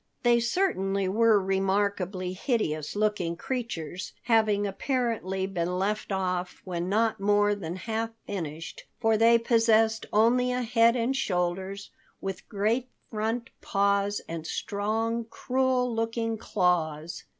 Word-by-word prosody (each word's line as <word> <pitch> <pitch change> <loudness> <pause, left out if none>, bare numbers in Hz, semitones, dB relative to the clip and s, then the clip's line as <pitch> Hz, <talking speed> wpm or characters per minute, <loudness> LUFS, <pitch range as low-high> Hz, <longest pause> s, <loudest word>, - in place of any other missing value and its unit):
They 240 -1 +5
certainly 200 - 0
were 220 +2 +4
remarkably 190 -1 0
hideous 185 - -1
looking 205 -5 0
creatures, 185 - -4
having 220 -3 +3
apparently 200 -3 -1
been 180 -2 -2
left 210 +3 -1
off 185 -2 -2
when 175 -1 -3
not 220 +1 +1
more 205 +1 +3
than 175 -4 -5
half 225 +4 -2 0.2
finished, 165 -5 -6
for 225 0 +3
they 230 +2 +6
possessed 225 -1 +3
only 245 +4 +3
a 250 0 -1
head 230 0 +4
and 245 +2 0
shoulders, 190 -3 -2 0.3
with 195 -1 -6
great 225 +5 0 0.2
front 225 +2 -2
paws 200 0 +1
and 165 -1 -5
strong, 225 +5 -1
cruel 255 0 0
looking 225 0 -1
claws. 170 -6 -1
205 Hz, 120 wpm, -27 LUFS, 185-230 Hz, 0.3 s, they